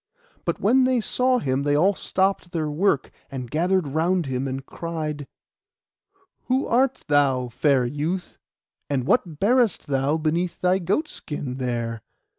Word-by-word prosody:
But - - -1
when 255 +5 +4
they 255 -1 +2
saw 255 +3 +1
him 135 - 0
they 145 0 +1
all 185 +7 +4
stopped 190 -1 0
their 155 -3 -1
work, 155 -2 +1 0.2
and 125 -3 -6
gathered 175 0 +1
round 170 +4 +1
him, 130 0 -2
and 135 +1 -4
cried— 155 -4 -5 1.2
'Who 260 +2 +1
art 260 +2 +1
thou, 135 -4 +2
fair 135 +1 +2
youth? 155 +8 -3 0.5
and 135 -3 0
what 160 - +1
bearest 235 -1 +2
thou 140 +2 +1
beneath 165 +3 -1
thy 185 +1 +2
goat 200 - 0
skin 145 - -6
there? 120 -3 -3
155 Hz, 145 wpm, -24 LUFS, 135-190 Hz, 1.2 s, when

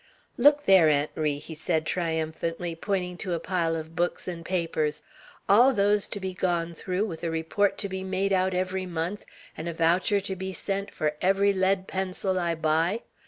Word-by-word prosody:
"Look 290 0 +5
there, 185 -5 +7
Aunt 145 0 +1
Ri!" 150 -2 -1
said 160 +1 -2
he, - - +1
triumphantly, 165 0 -2
pointing 180 0 -2
to 180 -1 -3
a 170 - -1
pile 170 -3 0
of 160 0 -6
books 175 +2 -1
and 170 -2 -5
papers. 165 -4 -1 0.4
"All 245 +6 +6
those 205 0 +2
to 205 - -5
be 190 -1 -4
gone 170 -2 -1
through 185 +4 -2
with, 165 -7 -6
and - - 0
a - - -2
report 165 +5 0
to 200 - -3
be 190 -1 -5
made 190 +1 0
out 185 0 +2
every 185 +1 -1
month, 175 +4 -4 0.3
and 165 +2 -4
a - - -4
voucher 175 +5 +2
to 195 -1 -4
be 190 +1 -5
sent 195 +1 -3
for 150 -1 -1
every 195 +2 +3
lead 190 0 +1
pencil 190 0 -2
I 170 -1 0
buy. 165 +7 +1
180 Hz, 195 wpm, -27 LUFS, 165-195 Hz, 0.4 s, there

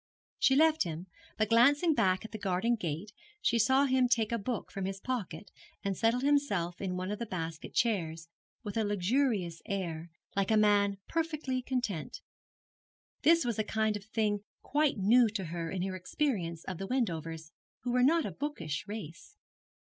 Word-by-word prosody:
She 265 - +4
left 315 +2 +4
him, 170 0 -5 0.3
but 215 -1 +1
glancing 285 +8 +5
back 190 -5 +2
at - - -8
the 220 - -6
garden 200 +4 +1
gate 175 0 -4 0.3
she 235 - +2
saw 265 +5 +4
him 260 -2 +3
take 230 -2 +2
a 235 - 0
book 230 +2 -4
from 195 -1 -3
his 195 0 -4
pocket 205 -7 -4 0.3
and 195 -1 -1
settle 230 +5 +2
himself 260 -12 +1
in 185 -2 -2
one 185 +2 -3
of 210 - -4
the 235 - -4
basket 165 -4 -5
chairs, 165 -8 0 0.4
with 205 -1 -5
a 220 - +2
luxurious 205 -3 0
air, 175 -5 -3 0.3
like 195 -1 +1
a 220 - +4
man 205 -1 +4
perfectly 305 -6 -1
content. 245 - -3 1.0
This 335 -1 +5
was 235 -3 -1
a - - +3
kind 220 0 0
of 205 -1 -7
thing 210 -2 0 0.2
quite 295 -2 +1
new 225 +4 +5
to 205 -3 -3
her 165 0 -4
in 180 +1 -2
her 190 0 -3
experience 185 - -2
of 185 -3 -6
the 195 - -4
Wendovers, 165 - -2 0.3
who 245 - -2
were 250 +1 +3
not 320 +5 +4
a - - -3
bookish 265 - -4
race. 205 -3 -8
210 Hz, 175 wpm, -31 LUFS, 185-250 Hz, 1.0 s, glancing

